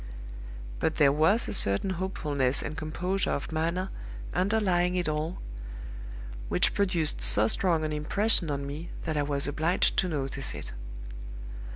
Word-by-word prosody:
But 160 - 0
there 145 -3 +4
was 160 +11 +2
a - - -3
certain 100 - +5
hopefulness 150 -8 -1
and 155 - -5
composure 180 +4 -1
of 140 - -3
manner 170 +4 -2 0.4
underlying 185 -1 +1
it 180 -2 -1
all, 155 +3 -3 1.1
which - - +2
produced 175 -6 0
so 110 +2 +6
strong 165 +5 +1
an 155 - -3
impression 170 +4 0
on 140 -1 -3
me 150 +4 -7
that 160 -2 -3
I 145 - +1
was 140 -1 -1
obliged 155 +5 0
to 185 - +2
notice 135 -4 -3
it. - - -8
160 Hz, 145 wpm, -27 LUFS, 145-185 Hz, 1.1 s, so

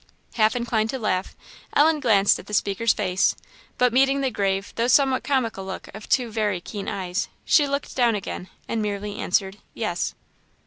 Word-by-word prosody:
Half 220 0 +3
inclined 230 -2 0
to 265 - -2
laugh, 195 -6 -2 0.4
Ellen 310 +1 +4
glanced 205 -7 +4
at - - -12
the 210 - -2
speaker's 205 +4 +2
face, 185 -3 +1 0.4
but 250 -2 +3
meeting 270 +2 +3
the 265 -2 0
grave 195 -2 -1
though 230 +1 +1
somewhat 265 +1 +3
comical 235 -8 -1
look 190 0 -7
of 215 +1 -10
two 245 -3 +2
very 210 -4 0
keen 200 +3 -7
eyes, 185 +1 -2 0.2
she 295 -2 +4
looked 280 0 -3
down 240 -3 +3
again, 185 -2 -5 0.2
and 230 - -1
merely 205 0 -3
answered, 195 +1 0 0.2
"yes." - - -2
220 Hz, 175 wpm, -24 LUFS, 195-250 Hz, 0.4 s, Ellen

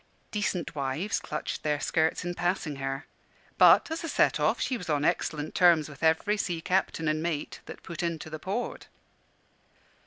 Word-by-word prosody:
Decent 190 -7 -2
wives 145 +7 -1
clutched 150 - -4
their 150 -1 0
skirts 160 +2 0
in 175 - -2
passing 175 -5 -1
her: 135 +1 -3 0.5
but, - - +7
as 325 +1 -3
a 330 - -3
set - - +3
off, - - +2
she 260 - 0
was 180 -8 -7
on 145 -1 +1
excellent 155 -1 -1
terms 170 -4 +5
with 145 -3 -12
every 165 +6 +2
sea 175 -4 -2
captain 180 -2 0
and 155 0 +1
mate 160 -3 -3
that - - -10
put 170 - -6
into 170 -3 -3
the 155 - -5
port. 200 +9 -4
165 Hz, 175 wpm, -28 LUFS, 150-185 Hz, 0.5 s, but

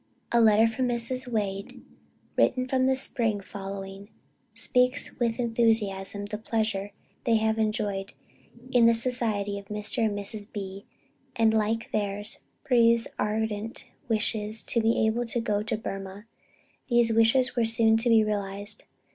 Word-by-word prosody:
_" - - -38 0.3
A 235 - +6
letter 220 0 +6
from 250 +3 -1
Mrs. 245 +2 -2
Wade 200 -4 -3 0.6
written 255 0 +2
in 260 0 +3
the 265 - +3
spring 230 -5 -1
following, 195 0 -8 0.4
speaks 250 +4 +1
with 235 -2 0
enthusiasm 220 -4 +1
of 205 - -7
the 210 0 -4
pleasure 215 -3 -2 0.3
they 230 -2 +3
have 220 0 +1
enjoyed 205 -2 -1 0.6
in 240 -2 +5
the 230 - +5
society 225 -4 +1
of 200 - -14
Mr. 210 +2 -1
and 210 -2 0
Mrs. 205 +1 -4
B, 195 -1 -7 0.5
and, 225 -1 +3
like 220 +1 0
theirs, 205 +1 -3 0.3
breathes 235 -3 +4
ardent 215 +1 -2 0.2
wishes 215 -1 -1
to 235 - +1
be 225 0 +2
able 230 +2 0
to 235 - 0
go 210 -3 0
to 215 - -2
Burmah. 195 -1 -7 0.6
These 240 -2 +3
wishes 230 +3 +3
were 235 -2 +2
soon 225 0 +3
to 230 +2 +1
be 225 -1 +6
realized. 205 0 -4
220 Hz, 150 wpm, -27 LUFS, 205-230 Hz, 0.6 s, A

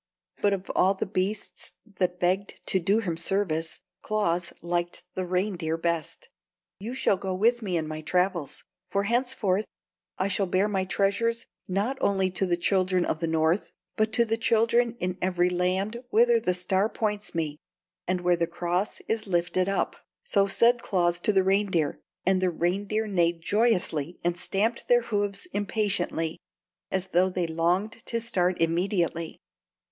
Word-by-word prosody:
But 205 -1 +3
of 195 -1 -4
all 190 +2 +3
the - - -2
beasts 200 +1 -3 0.3
that 180 -1 0
begged 185 +3 -1
to 190 - +2
do 200 +6 +2
him 175 -6 -2
service, 165 -3 -1 0.2
Claus 180 -5 0
liked 175 0 -2
the 185 -1 -3
reindeer 180 -3 -1
best. 170 - -2 0.5
"You 230 +6 -5
shall 205 -6 +2
go 190 0 -3
with 235 +5 +2
me 185 -5 -1
in 160 -1 -2
my 155 0 -5
travels; 180 -2 -1 0.3
for 200 0 0
henceforth 225 -3 +1 0.5
I 190 - +1
shall 195 0 0
bear 185 +3 +2
my 190 -3 0
treasures 205 +5 0 0.2
not 205 +9 -1
only 190 -2 +2
to 185 +1 0
the 175 -1 +1
children 185 0 +2
of 155 - -1
the 165 - -1
North, 160 +3 +1 0.2
but 215 0 +1
to 235 - +4
the 225 0 0
children 235 +1 +2
in 180 +1 -2
every 180 -1 +2
land 190 +6 -1
whither 235 +1 +5
the 180 -5 0
Star 190 +3 +1
points 210 -4 -2
me 155 -2 -2 0.5
and 185 0 0
where 175 0 +3
the 170 -1 0
cross 175 +3 -2
is 220 -1 -1
lifted 175 +1 +1
up!" 195 - 0 0.3
So 200 - +3
said 235 +4 +3
Claus 175 -4 +1
to 210 - +3
the 190 -2 +3
reindeer, 190 -5 +1 0.3
and 185 0 +3
the 185 - +3
reindeer 195 +6 -1
neighed 175 -4 +1
joyously 180 -8 +1
and 175 0 +1
stamped 210 +6 -1
their 240 0 +5
hoofs 205 - -1
impatiently, 200 -6 -1 0.5
as 190 0 -2
though 180 +2 +3
they 180 -1 -1
longed 180 +8 0
to 230 - -1
start 185 -6 0
immediately. 170 -1 0
190 Hz, 160 wpm, -27 LUFS, 175-210 Hz, 0.5 s, whither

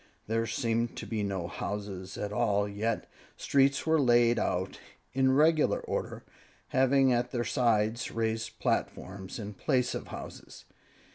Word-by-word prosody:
There 115 +1 0
seemed 115 +1 -1
to - - -5
be 110 -2 -2
no 95 -3 -2
houses 100 -1 -5
at 105 0 -3
all, 105 0 +1
yet 105 +3 -2 0.3
streets 140 -1 +2
were 160 -1 +3
laid 120 -2 +4
out 95 +1 -1 0.3
in 130 0 +3
regular 155 +2 +4
order, - - -4 0.5
having 135 0 +4
at 120 +1 0
their 120 -2 -1
sides 115 -1 +1
raised 110 0 -2
platforms 95 0 -2
in 105 -2 -6
place 125 +3 0
of - - -5
houses. - - -9
115 Hz, 140 wpm, -30 LUFS, 105-130 Hz, 0.5 s, laid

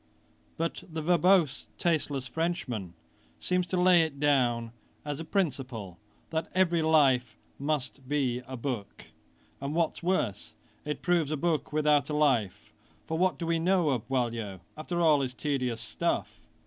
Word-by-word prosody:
But 165 +1 -2
the 160 -1 -4
verbose, 180 -2 +3
tasteless 150 -6 0
Frenchman 125 - -3 0.4
seems 180 0 0
to 180 - -1
lay 180 -1 +6
it 155 -4 -2
down 120 -5 +2 0.3
as 145 0 -3
a - - -4
principle, 130 - -2 0.3
that 160 0 -2
every 175 -3 +3
life 135 -8 +3 0.2
must 140 -2 -3
be 130 -4 0
a 130 0 -6
book, 115 -5 -5 0.5
and 140 +2 -3
what's 170 -1 0
worse, 170 - -1 0.3
it 150 0 -4
proves 175 -5 +2
a 155 - -1
book 165 0 0
without 150 -1 +2
a 150 - -1
life; 130 -10 +1 0.3
for 160 0 -2
what 185 0 +2
do 170 - -4
we 165 0 +1
know 175 -2 +2
of 120 -4 -2
Boileau, 115 -7 -2
after 170 +3 -3
all 155 -4 +5
his 125 -2 -3
tedious 130 -6 -1
stuff? - - -2
150 Hz, 150 wpm, -29 LUFS, 125-165 Hz, 0.5 s, lay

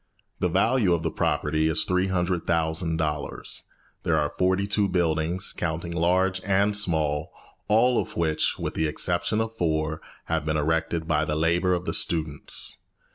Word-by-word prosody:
The 90 - +1
value 100 +1 +3
of 80 - -4
the 80 - -1
property 80 +1 0
is 80 - +2
$300,000. 85 -4 -1 0.4
There 80 -1 +1
are 75 -1 0
forty 95 +2 +1
two 100 0 +1
buildings, 85 0 0
counting 85 0 -3
large 90 +2 +1
and 100 +1 +2
small, 80 -7 0 0.4
all 120 +3 +4
of - - -9
which, 80 -2 +1
with - - -4
the 80 - 0
exception 85 +7 +1
of 110 0 -4
four, 80 -3 -1 0.2
have 80 -1 -1
been 75 0 -1
erected 80 +1 -1
by 75 -1 +2
the 75 -1 -1
labour 85 +3 +2
of 90 0 -4
the - - -2
students. 80 -3 0
85 Hz, 150 wpm, -25 LUFS, 80-95 Hz, 0.4 s, all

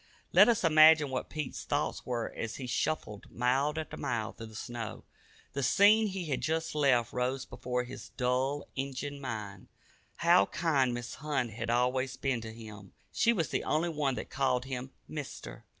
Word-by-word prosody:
Let - - +8
us 230 -5 +2
imagine 155 -2 +7
what 130 - -3
Pete's 150 -3 -5
thoughts - - -2
were 120 -2 -2
as 115 -1 -4
he 135 - -6
shuffled 125 -5 -2
mile 130 +4 +1
after 160 - -4
mile 115 -4 -2
through 115 - -9
the 110 - -13
snow. 115 0 -6 0.5
The 140 - -2
scene 205 - +5
he 190 -3 -4
had 145 -4 -2
just 160 +1 -1
left 130 -6 +2
rose 125 +2 -1
before 125 0 -3
his 125 - -9
dulled 130 +3 0
"Injun" 140 +1 -4
mind. 105 -7 -6 0.5
How 100 - +5
kind 135 -7 +1
Mrs. 120 0 -6
Hunt 140 -6 -1
had 115 +2 -5
always 125 +2 +1
been 130 -4 -1
to 110 0 -7
him! 105 -4 -11 0.2
She 230 0 +3
was 170 -10 0
the - - -1
only 160 +3 +1
one 145 -5 0
that - - -6
called 130 -2 +1
him 130 -1 -5 0.2
"Mister." 135 - -7
130 Hz, 175 wpm, -31 LUFS, 120-150 Hz, 0.5 s, Let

